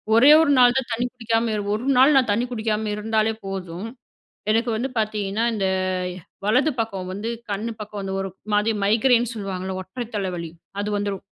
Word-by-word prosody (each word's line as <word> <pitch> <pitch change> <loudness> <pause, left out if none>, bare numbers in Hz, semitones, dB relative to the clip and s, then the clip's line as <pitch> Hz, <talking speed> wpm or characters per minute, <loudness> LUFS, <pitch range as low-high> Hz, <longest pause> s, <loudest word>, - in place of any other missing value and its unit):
ஒரே 260 +6 +8
ஒரு 315 -3 +3
நாள் 245 0 +6
தான் 250 -2 -7
தண்ணீ 245 +2 0
குடிக்காம 230 -2 0 0.2
ஒரு 220 - -4 0.2
நாள் 275 +3 +6
நான் 255 -4 +3
தண்ணீ 230 +4 +1
குடிக்காம 220 -1 -1
இருந்தாலே 220 +1 0
போதும், 190 0 -5 0.6
எனக்கு 230 +2 +1
வந்து 260 +4 -2
பார்த்தீங்கன்னா, 210 0 -1
இந்த 195 -2 0 0.8
வலது 260 +8 +3
பக்கம் 195 -5 -4
வந்து, 210 +4 -4 0.2
கண்ணு 215 +4 -2
பக்கம் 210 -1 -6
வந்து 195 0 -3
ஒரு 195 0 -4 0.2
மாதிரி 210 +2 +2
மைக்ரைன் 235 +2 +3
சொல்லுவாங்கல்ல, 190 -2 -4
ஒற்றை 235 +6 -6
தலைவலி 180 -4 -3 0.3
அது 205 - -2
வந்துரும். 200 -1 -3
215 Hz, 165 wpm, -23 LUFS, 195-235 Hz, 0.8 s, ஒரே